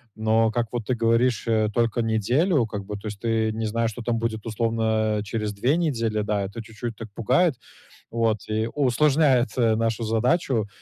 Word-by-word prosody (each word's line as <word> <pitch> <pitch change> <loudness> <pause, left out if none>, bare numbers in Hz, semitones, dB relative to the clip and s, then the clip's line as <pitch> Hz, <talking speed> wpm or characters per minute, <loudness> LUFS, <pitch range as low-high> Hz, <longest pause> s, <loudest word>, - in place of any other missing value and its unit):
Но 110 0 +2
как 120 -1 -1
вот 120 -3 -3
ты 130 - 0
говоришь, 115 +1 +2
э, 110 -2 +2
только 120 0 +1
неделю 120 - +2
как 100 -2 -6
бы. 105 0 -5
То 100 +2 -7
есть 105 -1 -6
ты 110 -1 0
не 110 0 -3
знаешь, 115 +1 0
что 120 - -8
там 115 -1 0
будет 115 -1 -3
условно, 110 -1 0
э, 105 - -3
через 105 0 -3
2 130 +10 +1
недели, 115 -10 0
да. 105 -1 -1
Это 100 +4 -6
чуть-чуть 110 +1 -6
так 110 -1 -9
пугает, 130 - +2 0.6
вот, 115 -2 +1
и 110 +1 -1
усложняет, 135 -2 +3
э, 115 -3 +3
нашу 115 +1 -1
задачу. 115 - +1
115 Hz, 190 wpm, -24 LUFS, 110-120 Hz, 0.6 s, усложняет